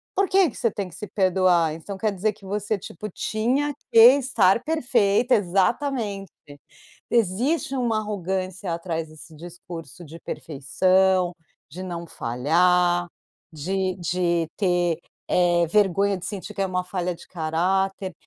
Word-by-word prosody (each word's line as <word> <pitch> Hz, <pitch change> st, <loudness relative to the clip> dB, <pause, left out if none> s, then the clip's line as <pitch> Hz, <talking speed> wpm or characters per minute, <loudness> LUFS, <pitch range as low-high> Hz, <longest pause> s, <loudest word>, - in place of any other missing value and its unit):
por 390 Hz, 0 st, +2 dB
que 380 Hz, -4 st, +4 dB
que -, -, -13 dB
você 230 Hz, -, +1 dB
tem 195 Hz, -2 st, -4 dB
que 165 Hz, -, -14 dB
se 210 Hz, -, -7 dB
perdoar? 185 Hz, -4 st, +2 dB
Então 190 Hz, +5 st, -8 dB
quer 215 Hz, +2 st, 0 dB
dizer 205 Hz, +2 st, -1 dB
que 195 Hz, -, -18 dB
você, 205 Hz, +2 st, -2 dB
tipo, 200 Hz, +3 st, -8 dB
tinha 255 Hz, +10 st, -1 dB, 0.2 s
que -, -, +1 dB, 0.2 s
estar 230 Hz, -7 st, +2 dB
perfeita 245 Hz, -6 st, +2 dB
exatamente! 200 Hz, +2 st, 0 dB, 0.8 s
Existe 240 Hz, -, +1 dB
uma 235 Hz, -3 st, 0 dB
arrogância 190 Hz, -3 st, -3 dB
atrás 165 Hz, -2 st, -4 dB
desse 155 Hz, +1 st, -14 dB
discurso 175 Hz, +1 st, -10 dB
de 160 Hz, +2 st, -11 dB
perfeição, 185 Hz, +5 st, +1 dB, 0.4 s
de 180 Hz, +5 st, -8 dB
não 170 Hz, -2 st, -6 dB
falhar, 175 Hz, +8 st, +2 dB, 0.5 s
de 185 Hz, +4 st, -2 dB
de 175 Hz, -1 st, 0 dB
ter, 175 Hz, -4 st, +1 dB, 0.3 s
eh, 175 Hz, -1 st, +3 dB
vergonha 200 Hz, 0 st, +2 dB
de 175 Hz, -, -7 dB
sentir 205 Hz, +1 st, -6 dB
que 195 Hz, -, -5 dB
é -, -, +1 dB
uma 180 Hz, -1 st, -2 dB
falha 180 Hz, -1 st, -3 dB
de -, -, -15 dB
caráter. 185 Hz, +3 st, -1 dB
185 Hz, 140 wpm, -24 LUFS, 175-210 Hz, 0.8 s, que